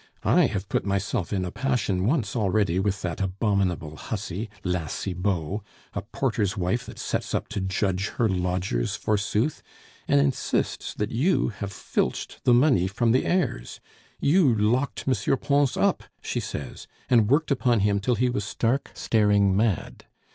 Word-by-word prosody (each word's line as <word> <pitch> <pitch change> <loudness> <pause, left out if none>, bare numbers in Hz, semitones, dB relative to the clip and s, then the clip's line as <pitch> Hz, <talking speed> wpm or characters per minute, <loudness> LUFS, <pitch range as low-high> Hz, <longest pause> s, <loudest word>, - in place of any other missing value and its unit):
I - - +5
have 95 0 -4
put - - 0
myself 100 0 -1
in 95 -3 0
a 90 - -4
passion 105 -8 0
once 120 -6 0
already 100 -4 +1
with 95 0 -1
that 90 +1 -3
abominable 95 -5 0
hussy, 110 0 -4
La 90 -4 -1
Cibot, 90 +3 -2 0.3
a 100 - -2
porter's 105 -2 -1
wife 95 +6 -1
that - - -10
sets - - -2
up - - -2
to 105 -2 -3
judge 95 0 0
her 115 - +3
lodgers, 90 - -1
forsooth, 105 +6 0 0.5
and - - +4
insists 70 0 -1
that 105 0 -2
you 155 +11 +2
have 100 -2 -6
filched 65 - -3
the 125 - +6
money 125 - +4
from 115 +4 +1
the 130 - +2
heirs; 175 - -1 0.4
you 150 -2 +4
locked 120 +6 +1
M. 130 +1 +1
Pons 140 0 +1
up, - - +1 0.2
she - - -2
says, - - -6 0.2
and 115 -5 +4
worked 150 +3 +2
upon 120 -5 +2
him 100 0 +2
till 120 +5 +1
he 125 +3 +1
was 105 - -2
stark, 120 +6 -1
staring 105 -3 +3
mad. 105 -3 -1
105 Hz, 160 wpm, -25 LUFS, 95-120 Hz, 0.5 s, the